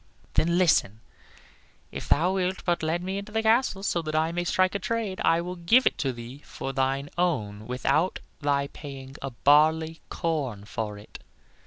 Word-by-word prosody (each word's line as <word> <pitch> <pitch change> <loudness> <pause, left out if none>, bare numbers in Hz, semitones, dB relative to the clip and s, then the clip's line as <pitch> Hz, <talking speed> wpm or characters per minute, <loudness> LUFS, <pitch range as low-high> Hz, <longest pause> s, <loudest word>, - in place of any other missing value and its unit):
"Then 170 +2 +2
listen; 150 - +3 0.9
if - - -7
thou 175 +5 +3
wilt 185 0 -1
but 175 -1 +1
let 160 +2 -1
me 190 +2 -2
into 200 +1 -9
the 220 +1 0
castle, 220 -3 +2
so 175 -4 0
that 155 -1 -4
I 160 +1 +2
may 175 +1 -1
strike 185 +1 +2
a 200 - -1
trade, 225 -3 -2
I 165 +1 +3
will 180 +1 -5
give 225 +10 +4
it - - +2
to 135 - 0
thee 120 +3 -9
for 135 - -6
thine 135 +1 -1
own 110 -12 -1
without 135 +8 +1 0.2
thy 140 -1 +1
paying 135 -3 -9
a 135 - -3
barley 155 +5 +3
corn 140 - -2
for 105 -1 -4
it." 105 - -12
160 Hz, 180 wpm, -27 LUFS, 135-185 Hz, 0.9 s, give